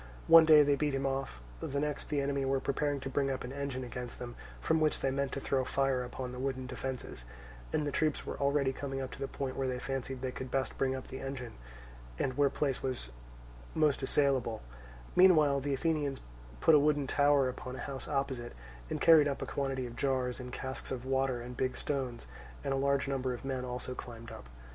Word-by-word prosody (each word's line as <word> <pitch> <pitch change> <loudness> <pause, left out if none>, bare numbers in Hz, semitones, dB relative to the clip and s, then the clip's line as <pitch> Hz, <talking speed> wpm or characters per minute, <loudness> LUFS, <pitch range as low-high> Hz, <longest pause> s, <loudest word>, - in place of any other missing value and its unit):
One 165 -1 +9
day 155 -2 +8
they 145 0 +3
beat 145 -1 0
him 135 0 -1
off; 135 - -2 0.2
the 140 - -2
next 150 0 -2
the 145 -2 +1
enemy 140 0 0
were 135 0 +1
preparing 145 +1 0
to - - -4
bring 135 +1 0
up 135 -1 -2
an 125 - -6
engine 140 -2 -3
against 125 -1 -6
them 120 -1 -7 0.2
from 160 0 +2
which 155 -1 +2
they 135 - 0
meant 140 0 -1
to - - -2
throw 135 -1 0
fire 135 -1 +1
upon 125 0 -5
the 125 - -7
wooden 130 -1 -2
defences, 125 - -5 0.5
and 150 - 0
the 145 - -1
troops 155 +1 0
were - - -5
already 140 -1 +2
coming 135 0 -4
up 130 -1 -4
to - - -9
the 135 - -2
point 135 -1 -4
where 135 - -1
they 125 -1 -1
fancied 135 0 -4
they 130 - -1
could 130 +1 -6
best 135 +1 -1
bring 130 -1 +1
up 130 - -6
the 130 - -6
engine, 130 -4 -5 0.6
and 130 - -1
where 145 0 +4
place 135 -1 -1
was 125 - -3 0.6
most 150 -3 +3
assailable; 135 -5 +1 0.5
meanwhile 155 -7 +6
the 140 0 -1
Athenians 145 -2 0 0.4
put - - +6
a 150 - +8
wooden 145 -1 +2
tower 145 0 +4
upon 125 0 -5
a - - -7
house 135 -2 -5
opposite, 135 -4 -2 0.4
and - - -2
carried 160 -3 +7
up 140 - -2
a - - -3
quantity 135 -2 -2
of 120 -1 -7
jars 130 -2 0
and 125 -1 -7
casks 130 +1 -5
of 130 -1 -4
water 130 -2 +1
and 125 +1 -7
big 130 +1 -1
stones, 130 -5 -3 0.4
and 140 - 0
a - - +1
large 140 0 +1
number 130 -2 -1
of 120 - -10
men 130 -2 -2
also 125 0 -4
climbed 115 -2 -8
up. - - -10
135 Hz, 220 wpm, -32 LUFS, 130-140 Hz, 0.6 s, One